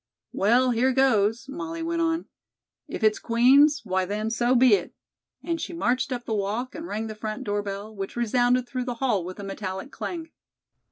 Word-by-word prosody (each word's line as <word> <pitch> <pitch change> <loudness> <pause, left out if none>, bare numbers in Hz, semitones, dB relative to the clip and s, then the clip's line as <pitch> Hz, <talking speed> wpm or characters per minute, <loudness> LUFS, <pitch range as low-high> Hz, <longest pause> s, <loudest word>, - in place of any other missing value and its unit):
"Well, 245 +5 +3
here 245 +3 +2
goes," 235 -3 +2
Molly 330 +3 -5
went 335 0 -1
on. 330 0 0 0.6
"If - - -6
it's 215 -1 +3
Queen's, 275 +6 +5
why 190 -1 0
then, 210 +4 -2
so 240 +2 +2
be 250 -2 +6
it," 190 -4 0 0.5
and 335 -2 -2
she - - -5
marched 255 -4 0
up 245 -1 -3
the 225 - -2
walk 215 +6 -2
and 325 +1 -7
rang 220 -4 -3
the 220 - -5
front 215 +3 -5
door 205 -3 -1
bell, 205 +2 -6
which 195 -1 -5
resounded 245 +1 +2
through 255 0 -3
the 245 -1 -3
hall 230 -7 0
with 185 +3 -8
a - - -6
metallic 195 +4 -5
clang. 330 -2 -6
240 Hz, 190 wpm, -25 LUFS, 210-270 Hz, 0.6 s, be